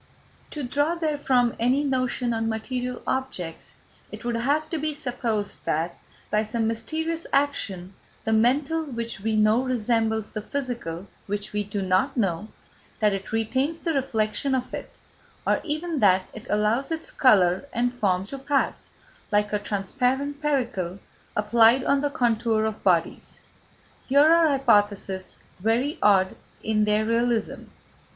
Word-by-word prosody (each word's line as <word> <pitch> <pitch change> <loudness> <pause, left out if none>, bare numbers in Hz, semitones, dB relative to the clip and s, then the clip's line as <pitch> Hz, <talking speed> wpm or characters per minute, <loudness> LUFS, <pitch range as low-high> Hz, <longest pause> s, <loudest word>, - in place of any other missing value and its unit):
To 295 - -5
draw 290 +6 0
therefrom 285 -7 +1
any 255 +5 +2
notion 255 -3 0
on 225 0 -1
material 245 +3 -3
objects, 190 -11 -4 0.4
it - - -9
would 240 - 0
have 285 +6 +1
to 325 - -1
be 305 0 -2
supposed 230 -6 -3
that, 165 +2 -1 0.4
by 210 - +3
some 225 +1 -1
mysterious 320 +9 -2
action, 200 -10 -1 0.3
the 220 - 0
mental 270 +8 +2
which 235 -7 -5
we 220 +2 -1
know 215 +3 +4
resembles 225 -3 0
the 215 - -4
physical 235 -9 -4 0.2
which 205 +1 -4
we 210 0 0
do 205 -1 -3
not 190 +10 +1
know, 195 -2 0 0.5
that 210 -3 +3
it 195 0 -5
retains 260 +9 -1
the 330 - 0
reflection 260 -1 0
of 255 -1 -3
it, - - -6 0.5
or - - +2
even 315 0 -2
that 190 -3 +4
it 220 +3 -10
allows 215 +7 +1
its 325 0 -4
colour 190 -3 +4
and 245 +1 0
form 190 -6 0
to 275 +7 -7
pass, 275 +1 -1 0.4
like 210 0 +1
a 210 - +2
transparent 255 +8 -1
pellicle 235 - -1 0.4
applied 225 +4 +4
on 280 0 +2
the 290 - +1
contour 230 -5 +1
of 220 -1 -4
bodies. 170 -3 0 0.7
Here 280 +3 +5
are 335 -1 +5
hypotheses 205 -8 +1 0.2
very 235 - 0
odd 190 -2 +4 0.3
in 215 -1 +2
their 210 +1 +2
realism. 230 0 0
230 Hz, 145 wpm, -25 LUFS, 210-275 Hz, 0.7 s, Here